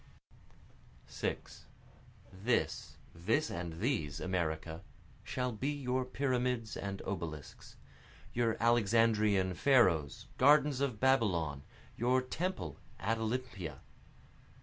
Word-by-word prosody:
6 -, -, -5 dB, 0.7 s
(This, 105 Hz, +6 st, -1 dB, 0.2 s
this 110 Hz, -, 0 dB
and 85 Hz, -1 st, -4 dB
these, 100 Hz, -, -1 dB
America, 80 Hz, -3 st, -2 dB, 0.4 s
shall 125 Hz, -1 st, -2 dB
be 125 Hz, +6 st, -2 dB
your 130 Hz, -3 st, -1 dB
pyramids 125 Hz, -3 st, -1 dB
and 100 Hz, -1 st, -5 dB
obelisks, 80 Hz, -6 st, -6 dB, 0.6 s
Your 115 Hz, -1 st, +1 dB
Alexandrian 110 Hz, -4 st, +3 dB
Pharos, 85 Hz, -, +3 dB
gardens 145 Hz, 0 st, +5 dB
of 130 Hz, -7 st, -1 dB
Babylon, 90 Hz, -, +2 dB, 0.4 s
Your 125 Hz, +2 st, +3 dB
temple 130 Hz, -, -3 dB, 0.2 s
at 115 Hz, +1 st, 0 dB
Olympia.) 110 Hz, -6 st, -3 dB
115 Hz, 90 wpm, -33 LUFS, 90-130 Hz, 0.7 s, gardens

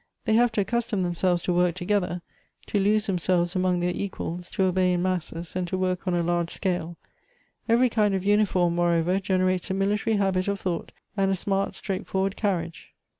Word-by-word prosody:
They 220 Hz, -, +2 dB
have 240 Hz, +1 st, +4 dB
to 210 Hz, -, +2 dB
accustom 225 Hz, -1 st, -1 dB
them 175 Hz, -1 st, -1 dB
selves 175 Hz, 0 st, +1 dB
to 180 Hz, -, 0 dB
work 175 Hz, -1 st, +2 dB
togetlier; 180 Hz, -1 st, -1 dB, 0.4 s
to 205 Hz, -, 0 dB
lose 210 Hz, +2 st, +2 dB
themselves 180 Hz, -2 st, +1 dB
among 185 Hz, -1 st, +1 dB
their 175 Hz, 0 st, 0 dB
equals; 180 Hz, -2 st, -5 dB
to 190 Hz, -, 0 dB
obey 185 Hz, -1 st, +2 dB
in 175 Hz, 0 st, 0 dB
masses, 175 Hz, -2 st, -3 dB
and 180 Hz, -1 st, -1 dB
to 185 Hz, -, -2 dB
work 185 Hz, 0 st, -1 dB
on 180 Hz, -, +1 dB
a 170 Hz, -, +1 dB
large 170 Hz, 0 st, 0 dB
scale. 175 Hz, -3 st, -2 dB, 0.7 s
Every 240 Hz, +3 st, +5 dB
kind 210 Hz, -4 st, +1 dB
of 190 Hz, -, -2 dB
uniform, 200 Hz, -4 st, +3 dB
moreover, 175 Hz, +1 st, +2 dB
genei 185 Hz, -1 st, +1 dB
ates 185 Hz, +2 st, -4 dB
a 190 Hz, -, -1 dB
military 205 Hz, +3 st, +1 dB
habit 195 Hz, -2 st, +1 dB
of 200 Hz, 0 st, -1 dB
thought, 175 Hz, -3 st, -3 dB, 0.2 s
and 195 Hz, -1 st, +2 dB
a 195 Hz, -, +2 dB
smart, 195 Hz, +1 st, -1 dB
straightforwai'd 195 Hz, 0 st, -2 dB
carriage. 170 Hz, -6 st, -3 dB
185 Hz, 195 wpm, -26 LUFS, 175-200 Hz, 0.7 s, Every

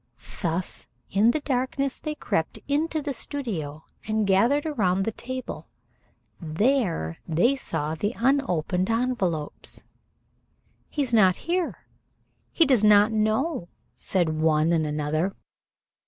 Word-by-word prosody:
Thus 175 Hz, 0 st, -2 dB, 0.2 s
in 205 Hz, +4 st, +4 dB
the 300 Hz, +5 st, +1 dB
darkness 270 Hz, 0 st, -1 dB
they 305 Hz, -1 st, -4 dB
crept 160 Hz, -, -2 dB
into 310 Hz, +2 st, 0 dB
the 285 Hz, -1 st, -2 dB
studio 175 Hz, -, -4 dB, 0.2 s
and 215 Hz, -1 st, +1 dB
gathered 230 Hz, +10 st, +3 dB
around 195 Hz, -, +1 dB
the 225 Hz, -, 0 dB
table. 255 Hz, +4 st, -6 dB, 0.7 s
There 170 Hz, -, 0 dB
they 175 Hz, -, +3 dB
saw 155 Hz, -, -3 dB
the 205 Hz, +9 st, -2 dB
unopened 190 Hz, -, +1 dB
envelopes. 225 Hz, -10 st, -1 dB, 1.1 s
"He 290 Hz, -, -1 dB
is 250 Hz, -3 st, -2 dB
not 190 Hz, -5 st, +5 dB
here. 350 Hz, 0 st, -1 dB, 0.7 s
He 330 Hz, -, +4 dB
does 255 Hz, -7 st, +4 dB
not 210 Hz, +1 st, +6 dB
know," 220 Hz, -, 0 dB, 0.3 s
said 160 Hz, -4 st, 0 dB
one 160 Hz, +1 st, +3 dB
and 160 Hz, -2 st, +1 dB
another. 155 Hz, +5 st, -1 dB
215 Hz, 120 wpm, -25 LUFS, 165-265 Hz, 1.1 s, not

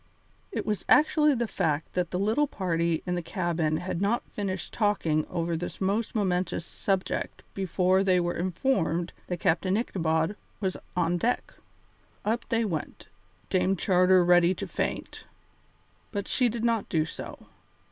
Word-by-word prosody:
It -, -, -3 dB
was 210 Hz, -4 st, -1 dB
actually 300 Hz, -1 st, +5 dB
the 240 Hz, -1 st, 0 dB
fact 155 Hz, -6 st, -1 dB
that 180 Hz, -2 st, 0 dB
the 180 Hz, -, -2 dB
little 220 Hz, +10 st, +2 dB
party 170 Hz, -, -1 dB
in 180 Hz, -, -1 dB
the 175 Hz, -, -1 dB
cabin 170 Hz, -3 st, -1 dB
had 180 Hz, 0 st, -3 dB
not 215 Hz, +4 st, +1 dB
finished 190 Hz, -3 st, -4 dB
talking 170 Hz, -8 st, +1 dB
over 170 Hz, 0 st, -1 dB
this 175 Hz, +2 st, -5 dB
most 205 Hz, +5 st, 0 dB
momentous 180 Hz, -4 st, 0 dB
subject 195 Hz, +1 st, -2 dB
before 190 Hz, 0 st, +2 dB
they 185 Hz, -2 st, +4 dB
were 175 Hz, 0 st, 0 dB
informed 175 Hz, -, 0 dB
that 180 Hz, -1 st, -3 dB
Captain 185 Hz, +5 st, +2 dB
Ichabod 165 Hz, -4 st, 0 dB, 0.2 s
was 190 Hz, -3 st, -1 dB, 0.2 s
on 175 Hz, 0 st, +2 dB
deck. 245 Hz, +7 st, -1 dB, 0.7 s
Up 230 Hz, +3 st, -1 dB
they 230 Hz, 0 st, +2 dB
went, 165 Hz, -7 st, -5 dB, 0.4 s
Dame 190 Hz, +1 st, +2 dB
Charter 185 Hz, -1 st, +4 dB
ready 175 Hz, +1 st, +5 dB
to -, -, -4 dB
faint. -, -, -4 dB, 0.9 s
But 200 Hz, -2 st, -3 dB
she 250 Hz, -2 st, +3 dB
did 230 Hz, 0 st, -4 dB
not 230 Hz, -3 st, +1 dB
do 155 Hz, -3 st, +2 dB
so. 165 Hz, -, -8 dB
185 Hz, 150 wpm, -28 LUFS, 170-210 Hz, 0.9 s, actually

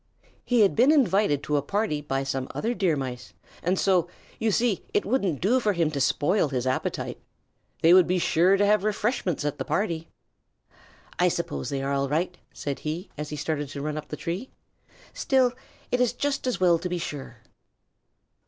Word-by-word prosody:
He 245 Hz, -2 st, +2 dB
had 200 Hz, -, +4 dB
been 250 Hz, +6 st, +5 dB
invited 205 Hz, -, +3 dB
to 150 Hz, -, 0 dB
a -, -, +1 dB
party 155 Hz, -1 st, -1 dB
by 135 Hz, -2 st, -2 dB
some 135 Hz, -1 st, -3 dB
other 235 Hz, +2 st, -1 dB
Deer 185 Hz, -7 st, +1 dB
Mice, 125 Hz, -3 st, -5 dB, 0.3 s
and 180 Hz, +2 st, +1 dB
so, 180 Hz, -3 st, +2 dB, 0.3 s
you 225 Hz, -, +1 dB
see, 225 Hz, -1 st, +1 dB
it -, -, +2 dB
wouldn't 200 Hz, -, 0 dB
do 235 Hz, +8 st, +3 dB
for 215 Hz, -4 st, +1 dB
him 165 Hz, -4 st, +1 dB
to 140 Hz, -2 st, -2 dB
spoil 155 Hz, +7 st, +2 dB
his 130 Hz, -2 st, -2 dB
appetite. 130 Hz, 0 st, -2 dB, 0.6 s
They 165 Hz, +2 st, +7 dB
would 185 Hz, -1 st, +7 dB
be 185 Hz, -, +1 dB
sure 180 Hz, +2 st, +3 dB
to 205 Hz, -, +3 dB
have 210 Hz, -1 st, +3 dB
refreshments 210 Hz, -, -1 dB
at 145 Hz, -, -2 dB
the -, -, -1 dB
party. 165 Hz, -6 st, -1 dB, 1.1 s
"I -, -, +5 dB
suppose 70 Hz, -1 st, -2 dB
they 135 Hz, -1 st, -2 dB
are 140 Hz, +1 st, -1 dB
all 140 Hz, 0 st, 0 dB
right," 175 Hz, +5 st, 0 dB, 0.2 s
said 140 Hz, -2 st, -4 dB
he, 160 Hz, +5 st, -5 dB
as 150 Hz, 0 st, -5 dB
he 150 Hz, -, -4 dB
started 145 Hz, -1 st, -2 dB
to 140 Hz, 0 st, -6 dB
run 150 Hz, 0 st, -2 dB
up 155 Hz, -, -6 dB
the 150 Hz, -, -6 dB
tree; 180 Hz, +9 st, -4 dB, 0.6 s
"still 260 Hz, -2 st, +2 dB, 0.4 s
it 250 Hz, -, +2 dB
is 245 Hz, -1 st, +2 dB
just 275 Hz, +1 st, -2 dB
as 245 Hz, -6 st, -1 dB
well 175 Hz, -2 st, +4 dB
to 180 Hz, +2 st, -4 dB
be 180 Hz, -, -1 dB
sure." 145 Hz, -5 st, -6 dB
175 Hz, 195 wpm, -26 LUFS, 145-210 Hz, 1.1 s, They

